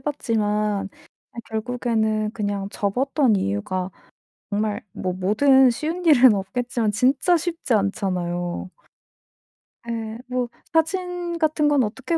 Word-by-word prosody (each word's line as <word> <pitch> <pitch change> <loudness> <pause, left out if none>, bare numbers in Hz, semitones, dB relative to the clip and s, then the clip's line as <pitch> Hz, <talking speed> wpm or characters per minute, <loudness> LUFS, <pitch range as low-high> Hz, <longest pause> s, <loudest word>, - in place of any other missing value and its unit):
봤지만 210 -7 -1 0.4
아 - - -14
결국에는 220 -2 -1
그냥 205 -3 -3
접었던 255 +4 +1
이유가 180 - -2 0.6
정말 210 0 -1
뭐 185 -1 -3
뭐든 255 +8 +4
쉬운 325 +8 -3
일은 260 -7 +7
없겠지만 230 +3 -1
진짜 275 - +3
쉽지 330 -6 -2
않잖아요. 180 -4 -1 1.2
예. 225 -1 -4
뭐 250 -1 -2 0.2
사진 350 +1 0
같은 310 -2 +2
건 285 -4 +3
어떻게 265 +9 -2
230 Hz, 230 characters per minute, -23 LUFS, 205-280 Hz, 1.2 s, 일은